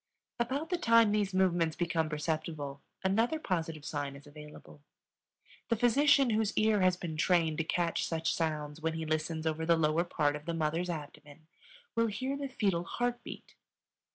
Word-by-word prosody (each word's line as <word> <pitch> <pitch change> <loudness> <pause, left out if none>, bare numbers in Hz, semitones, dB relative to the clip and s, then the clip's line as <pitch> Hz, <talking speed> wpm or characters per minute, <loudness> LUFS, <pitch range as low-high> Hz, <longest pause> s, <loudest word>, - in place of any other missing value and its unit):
About 275 +8 -2
the 355 - 0
time 230 -4 +5
these 205 -2 +1
movements 175 -4 +2
become 165 -2 0
perceptible 150 -2 -3 0.2
another 225 +10 +2
positive 165 - -3
sign 145 -2 -3
is 140 - -13
available. 150 0 -13 0.9
The 230 - +3
physician 270 +3 +4
whose 215 -1 0
ear 215 -2 +3
has 185 -1 +3
been 165 -3 -5
trained 165 -2 +2
to - - +2
catch 170 +1 0
such 165 -1 -1
sounds 155 -2 -2
when 160 0 -1
he 160 0 -3
listens 155 +1 -2
over 160 0 -1
the 165 0 +3
lower 160 +1 +2
part 145 -4 0
of 150 0 -8
the 170 - -2
mother's 165 +3 -1
abdomen 150 -1 -8 0.5
will 230 0 +3
hear 255 +6 -2
the 280 0 -4
fetal 195 -9 0
heart 245 +6 -2
beat. - - -10
170 Hz, 170 wpm, -31 LUFS, 155-215 Hz, 0.9 s, time